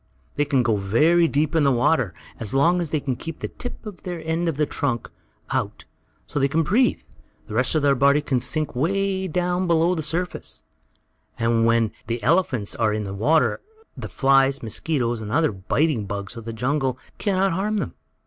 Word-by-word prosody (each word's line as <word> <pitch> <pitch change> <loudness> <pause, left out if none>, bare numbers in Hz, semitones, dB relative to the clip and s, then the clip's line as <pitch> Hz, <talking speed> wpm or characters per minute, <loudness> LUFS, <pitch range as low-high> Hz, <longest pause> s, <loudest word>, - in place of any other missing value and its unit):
They 145 - +1
can 135 -3 +2
go 120 -2 +2
in - - -4
very 160 - +4
deep 150 0 0
water, 130 - +2 0.2
and - - -21
as 110 +2 -2
long 170 +6 +3
as 165 - -3
they 155 - 0
can 135 -3 -2
keep 165 +5 -7
the - - -5
tip 245 -1 -8 0.2
end 165 -1 -2
of 150 - -3
their 150 - +2
trunk 125 -5 -2 0.4
out, - - -2 0.4
so - - -3
they 135 - +3
can 160 +4 +1
breathe, 235 - +2 0.4
the - - -9
rest 125 +7 +1
of 155 - +2
their 140 -1 +5
body 140 +2 +4
can 140 -4 0
sink 155 +4 -1
away 190 +6 0
down 180 +2 0
below 170 +1 +3
the 165 - -2
surface. 170 +4 -4 0.7
And 115 0 +2
when 115 -2 +2 0.2
the 115 -1 -3
elephants 135 - +1
are 110 -2 +1
in 105 0 -2
the 100 -1 -5
water 150 +11 +2 0.3
the - - -7
flies, 135 -1 +3
mosquitoes 120 0 -1
and 105 -1 -6
other 155 +3 +2
biting 110 - 0
bugs 100 +2 -5
of 115 -1 -9
the 115 - -4
jungle 130 +2 -1 0.2
can 200 -3 0
not 195 0 +2
harm 205 +5 -1
them. - - -3
145 Hz, 195 wpm, -23 LUFS, 115-165 Hz, 0.7 s, their